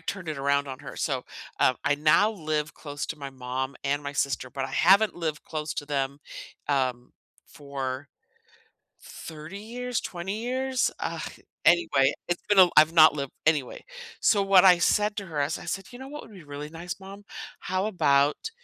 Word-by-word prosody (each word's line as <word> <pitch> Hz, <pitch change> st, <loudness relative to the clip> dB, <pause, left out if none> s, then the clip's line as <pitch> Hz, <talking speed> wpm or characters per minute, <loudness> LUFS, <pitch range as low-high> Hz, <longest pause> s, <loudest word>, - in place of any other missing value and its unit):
turned 175 Hz, 0 st, -5 dB
it 150 Hz, -, -3 dB
around 140 Hz, +1 st, +1 dB
on 130 Hz, +1 st, -7 dB
her, 140 Hz, -, -9 dB
so, 130 Hz, -4 st, -2 dB, 0.4 s
um, 130 Hz, -, +4 dB
I 140 Hz, -, +3 dB
now 155 Hz, +9 st, +4 dB
live 155 Hz, -5 st, -3 dB
close 145 Hz, -2 st, -6 dB
to 160 Hz, -, -6 dB
my 140 Hz, -1 st, -6 dB
mom 130 Hz, +1 st, -4 dB
and 145 Hz, +1 st, 0 dB
my 140 Hz, -, -5 dB
sister, 140 Hz, -2 st, -1 dB
but 135 Hz, -1 st, -3 dB
I -, -, -6 dB
haven't 195 Hz, +4 st, +5 dB
lived 160 Hz, -3 st, -4 dB
close 155 Hz, 0 st, -4 dB
to 145 Hz, -, -4 dB
them, 140 Hz, -1 st, -2 dB, 0.5 s
um, 130 Hz, -3 st, -1 dB, 0.3 s
for 140 Hz, -2 st, -6 dB, 0.9 s
30 160 Hz, +4 st, -9 dB
years, 245 Hz, +3 st, -4 dB
20 190 Hz, +5 st, -5 dB
years, 260 Hz, +1 st, 0 dB
ugh, -, -, -3 dB, 0.4 s
anyway, 165 Hz, -6 st, +4 dB, 0.2 s
it's 175 Hz, 0 st, -1 dB
been 205 Hz, -2 st, +3 dB
a -, -, +12 dB
l 180 Hz, -, +5 dB
I've 155 Hz, +1 st, +7 dB
not 155 Hz, -2 st, +7 dB
lived 140 Hz, -2 st, -4 dB
Anyway, 150 Hz, -6 st, +1 dB, 0.4 s
so 205 Hz, -2 st, +4 dB
what 195 Hz, -1 st, +6 dB
I 180 Hz, -2 st, +8 dB
said 210 Hz, +4 st, +2 dB
to 200 Hz, -2 st, -4 dB
her 155 Hz, -3 st, -3 dB
is, 145 Hz, +3 st, -1 dB
I -, -, -10 dB
said, 195 Hz, 0 st, -4 dB
"You 245 Hz, -, -10 dB
know 265 Hz, +1 st, -9 dB
what 295 Hz, +1 st, -8 dB
would 225 Hz, -, -14 dB
be 185 Hz, -5 st, -12 dB
really 145 Hz, +1 st, -7 dB
nice, 170 Hz, +4 st, -7 dB
Mom? 195 Hz, +1 st, -11 dB, 0.4 s
How 185 Hz, +2 st, -1 dB
about 145 Hz, -, +2 dB
155 Hz, 190 wpm, -27 LUFS, 140-195 Hz, 0.9 s, a